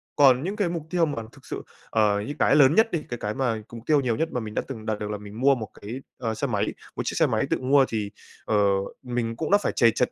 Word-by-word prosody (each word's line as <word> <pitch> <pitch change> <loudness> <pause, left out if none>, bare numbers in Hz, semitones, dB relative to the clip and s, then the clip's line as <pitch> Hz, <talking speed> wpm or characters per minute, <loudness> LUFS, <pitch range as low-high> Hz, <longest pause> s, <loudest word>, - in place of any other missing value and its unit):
Còn 135 -1 +6
những 195 +4 -2
cái 205 -5 0
mục 170 -2 -3
tiêu 175 -2 +2
mà 130 -7 -3
thực - - -18
sự - - -5 0.3
ờ, 105 -2 +2
như 110 +8 -4
cái - - +4
lớn 145 +1 +6
nhất 225 0 +4
đi, 165 -3 -1
cái 120 - -3
cái 105 - -2
mà 115 -4 -1
mục 115 - -8
tiêu 150 -2 +4
nhiều 120 -4 0
nhất 160 +7 -1
mà 125 - -1
mình 110 -2 -6
đã - - 0
từng 115 -5 -7
đạt 110 -1 -1
được 105 0 -4
là 105 - -2
mình 105 +2 -10
mua 140 0 +5
một 110 -4 -5
cái, 115 +6 -6 0.2
ờ, 115 -3 -2
xe 140 +6 -1
máy, 105 -4 -1 0.2
một - - -2
chiếc - - -2
xe - - +5
máy - - +1
tự - - +2
mua 135 +1 +5
thì, 105 -3 -2 0.3
ờ, 110 - 0 0.5
mình 120 -2 -2
cũng 155 +8 -3
đã 205 - +7
phải 205 - -1
trầy 115 -1 +5
trật 125 - 0
125 Hz, 290 wpm, -25 LUFS, 110-145 Hz, 0.5 s, đã